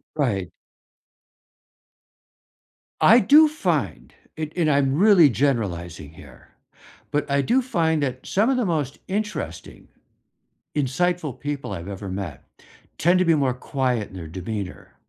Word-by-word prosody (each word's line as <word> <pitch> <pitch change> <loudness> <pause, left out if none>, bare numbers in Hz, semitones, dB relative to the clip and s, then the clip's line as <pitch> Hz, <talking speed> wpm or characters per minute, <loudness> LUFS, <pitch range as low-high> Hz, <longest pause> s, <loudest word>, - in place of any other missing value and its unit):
Right. 105 - -1 2.5
I 235 +2 +7
do 295 +10 +7
find 305 0 -2 0.2
it- 155 -1 -5
and 170 -3 +1
I'm 140 -2 +2
really 185 -5 +6
generalizing 90 - -2
here- 70 -6 -16 0.6
but 145 -1 -1
I 140 0 +2
do 250 - +2
find 165 - 0
that 130 -2 -3
some 215 +6 +2
of 270 - +2
the 245 -4 0
most 150 -5 -2
interesting, 190 - -5 0.9
insightful 150 0 -1
people 145 -5 -4
I've 85 -2 -6
ever 100 0 -6
met 95 -7 -6 0.5
tend 175 +3 +3
to 185 - +2
be 165 -1 +4
more 135 -4 +1
quiet 125 -3 -2
in - - -14
their 85 -3 -7
demeanor, 95 +3 -7
140 Hz, 130 wpm, -23 LUFS, -, 2.5 s, I